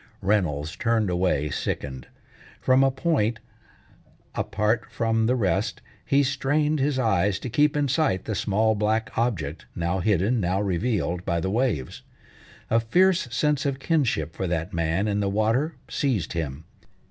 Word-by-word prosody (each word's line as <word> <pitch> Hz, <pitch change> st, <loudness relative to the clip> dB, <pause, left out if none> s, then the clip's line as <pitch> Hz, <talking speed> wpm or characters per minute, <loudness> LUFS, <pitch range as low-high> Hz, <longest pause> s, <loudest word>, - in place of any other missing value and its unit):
Reynolds 85 Hz, -7 st, 0 dB
turned 115 Hz, -5 st, +1 dB
away 90 Hz, -5 st, 0 dB
sickened. 65 Hz, -1 st, -4 dB, 0.5 s
From 130 Hz, +1 st, +4 dB
a 135 Hz, -, +4 dB
point, 130 Hz, -5 st, 0 dB, 1.0 s
apart 105 Hz, +3 st, 0 dB
from 115 Hz, -1 st, 0 dB
the 125 Hz, -, +2 dB
rest, 105 Hz, -1 st, 0 dB, 0.2 s
he 140 Hz, +1 st, +3 dB
strained 145 Hz, +3 st, +1 dB
his 135 Hz, 0 st, +1 dB
eyes 100 Hz, -5 st, +2 dB
to 125 Hz, -, -6 dB
keep 150 Hz, +4 st, +3 dB
in 145 Hz, -1 st, +1 dB
sight 135 Hz, -, +1 dB
the 110 Hz, -, -2 dB
small 110 Hz, +2 st, +1 dB
black 110 Hz, +1 st, -1 dB
object 90 Hz, -10 st, -2 dB
now 85 Hz, +2 st, -1 dB
hidden, 105 Hz, +4 st, +2 dB
now 95 Hz, 0 st, 0 dB
revealed, 95 Hz, -2 st, -1 dB
by 85 Hz, -3 st, 0 dB
the 95 Hz, +3 st, -2 dB
waves. 110 Hz, -, -1 dB, 0.7 s
A 115 Hz, -, +5 dB
fierce 180 Hz, +8 st, +3 dB
sense 150 Hz, +2 st, +1 dB
of 140 Hz, -2 st, -1 dB
kinship 130 Hz, -, 0 dB
for 95 Hz, -, -2 dB
that 85 Hz, +3 st, -2 dB
man 85 Hz, +4 st, 0 dB
in 105 Hz, -1 st, 0 dB
the 100 Hz, -1 st, 0 dB
water 115 Hz, +10 st, +1 dB
seized 120 Hz, -, -1 dB
him. 80 Hz, -3 st, -4 dB
110 Hz, 150 wpm, -25 LUFS, 90-130 Hz, 1.0 s, A